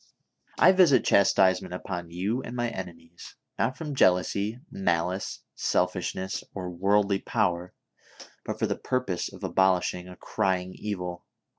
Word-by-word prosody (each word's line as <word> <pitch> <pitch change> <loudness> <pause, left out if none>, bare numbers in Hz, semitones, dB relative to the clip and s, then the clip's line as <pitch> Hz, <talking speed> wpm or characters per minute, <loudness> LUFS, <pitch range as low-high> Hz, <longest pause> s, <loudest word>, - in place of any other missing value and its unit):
"I - - +7
visit 175 -10 +5
chastisement 95 -2 +3
upon 90 -2 -5
you 100 +9 -2
and 125 - -7
my 120 -1 0
enemies, 85 -2 -9 0.2
not 125 +3 0
from 150 -3 -5
jealousy, 100 +1 +2
malice, 90 0 -1
selfishness 90 +1 -1
or 90 -2 -4
worldly 100 +2 +2
power, 90 -3 -1 0.7
but - - -4
for - - 0
the - - -1
purpose 125 -9 -2
of - - -12
abolishing 90 -1 +1
a 90 - -10
crying 95 0 -1
evil 90 -4 -5
95 Hz, 130 wpm, -27 LUFS, 90-105 Hz, 0.7 s, I